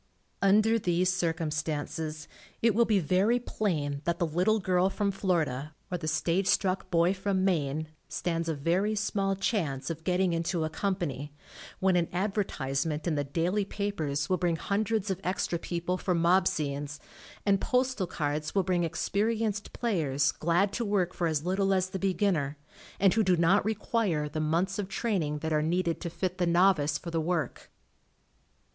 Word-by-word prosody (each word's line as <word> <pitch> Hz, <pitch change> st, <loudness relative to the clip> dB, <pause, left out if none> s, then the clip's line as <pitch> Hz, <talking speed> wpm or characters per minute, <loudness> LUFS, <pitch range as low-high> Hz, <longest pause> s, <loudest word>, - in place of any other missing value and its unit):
Under 215 Hz, +3 st, +4 dB
these 180 Hz, -1 st, +1 dB
circumstances 155 Hz, -2 st, -2 dB, 0.3 s
it 230 Hz, -1 st, +3 dB
will 235 Hz, +3 st, +4 dB
be 215 Hz, -3 st, +3 dB
very 190 Hz, +7 st, +2 dB
plain 155 Hz, -12 st, -2 dB
that 170 Hz, 0 st, 0 dB
the 175 Hz, -, +1 dB
little 180 Hz, +7 st, +2 dB
girl 185 Hz, -1 st, +2 dB
from 200 Hz, 0 st, 0 dB
Flor 190 Hz, -3 st, +1 dB
ida, 145 Hz, +2 st, -6 dB, 0.2 s
or 180 Hz, -, 0 dB
the 155 Hz, -, -5 dB
stage 170 Hz, +4 st, +1 dB
struck 190 Hz, -1 st, +1 dB
boy 170 Hz, +1 st, +3 dB
from 190 Hz, 0 st, 0 dB
Maine, 155 Hz, -4 st, 0 dB, 0.2 s
stands 165 Hz, -1 st, -2 dB
a 160 Hz, -, 0 dB
very 180 Hz, +9 st, +1 dB
small 200 Hz, -1 st, 0 dB
chance 165 Hz, -, -1 dB
of 160 Hz, 0 st, -7 dB
getting 180 Hz, 0 st, +1 dB
into 165 Hz, 0 st, -1 dB
a 155 Hz, -, -2 dB
company, 155 Hz, -8 st, -3 dB, 0.4 s
when 190 Hz, -1 st, +3 dB
an 170 Hz, -2 st, +2 dB
advertisement 160 Hz, -6 st, -1 dB
in 170 Hz, -, +1 dB
the 145 Hz, -1 st, 0 dB
daily 170 Hz, +8 st, 0 dB
papers 160 Hz, -9 st, -2 dB
will 185 Hz, -, +1 dB
bring 175 Hz, -2 st, +1 dB
hundreds 210 Hz, +3 st, -1 dB
of 190 Hz, 0 st, -3 dB
extra 180 Hz, -2 st, -1 dB
people 175 Hz, +2 st, -2 dB
for 180 Hz, -, 0 dB
mob 175 Hz, +3 st, +4 dB
scenes, 145 Hz, 0 st, -2 dB, 0.5 s
and 195 Hz, -1 st, +3 dB
postal 250 Hz, -6 st, +1 dB
cards 150 Hz, -1 st, -3 dB
will 195 Hz, -, +3 dB
bring 180 Hz, -1 st, +1 dB
experienced 210 Hz, +5 st, -1 dB
players 145 Hz, -, +1 dB
glad 175 Hz, +5 st, +1 dB
to 240 Hz, -, -1 dB
work 200 Hz, -4 st, 0 dB
for 170 Hz, -, 0 dB
as 155 Hz, -1 st, -1 dB
little 195 Hz, +1 st, +2 dB
as 185 Hz, 0 st, 0 dB
the 190 Hz, -, -3 dB
beginner, 180 Hz, -7 st, 0 dB, 0.4 s
and 195 Hz, -1 st, +5 dB
who 225 Hz, -, +3 dB
do 185 Hz, -3 st, +3 dB
not 170 Hz, +4 st, +4 dB
require 210 Hz, -7 st, 0 dB
the 150 Hz, +1 st, -4 dB
months 170 Hz, +6 st, 0 dB
of 200 Hz, -, -2 dB
train 205 Hz, -1 st, -1 dB
ing 150 Hz, -1 st, -2 dB
that 160 Hz, -, 0 dB
are 150 Hz, -, +3 dB
needed, 170 Hz, +1 st, 0 dB
to 170 Hz, -, -3 dB
fit 185 Hz, +2 st, -3 dB
the 175 Hz, -, +2 dB
novice 170 Hz, -4 st, +3 dB
for 170 Hz, -, -7 dB
the 165 Hz, -1 st, 0 dB
work. 160 Hz, -5 st, -2 dB
180 Hz, 175 wpm, -29 LUFS, 155-195 Hz, 0.5 s, and